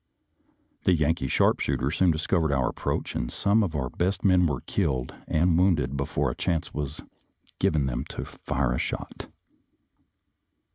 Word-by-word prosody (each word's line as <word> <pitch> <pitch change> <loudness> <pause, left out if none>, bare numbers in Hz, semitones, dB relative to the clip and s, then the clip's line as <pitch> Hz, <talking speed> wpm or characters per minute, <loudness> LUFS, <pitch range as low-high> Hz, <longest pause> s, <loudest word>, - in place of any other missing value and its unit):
The 90 - +5
Yankee 80 -1 +1
sharpshooters 70 +2 +1
soon 95 - +4
discovered 80 0 +1
our 65 -2 +1
approach, - - -3
and - - -2
some 100 +2 +2
of 90 -7 -1
our 65 -4 -2
best 95 +2 -1
men 90 -3 +5
were 70 -5 -2
killed 65 -1 -1
and 85 +2 +2
wounded 75 -8 +2
before 70 -1 -1
a - - -7
chance 85 -2 -1
was 75 0 -4 0.6
given 75 -3 +2
them 65 +1 -2
to - - -6
fire 65 -2 -2
a 60 - -1
shot. - - -5
75 Hz, 150 wpm, -26 LUFS, 65-90 Hz, 0.6 s, The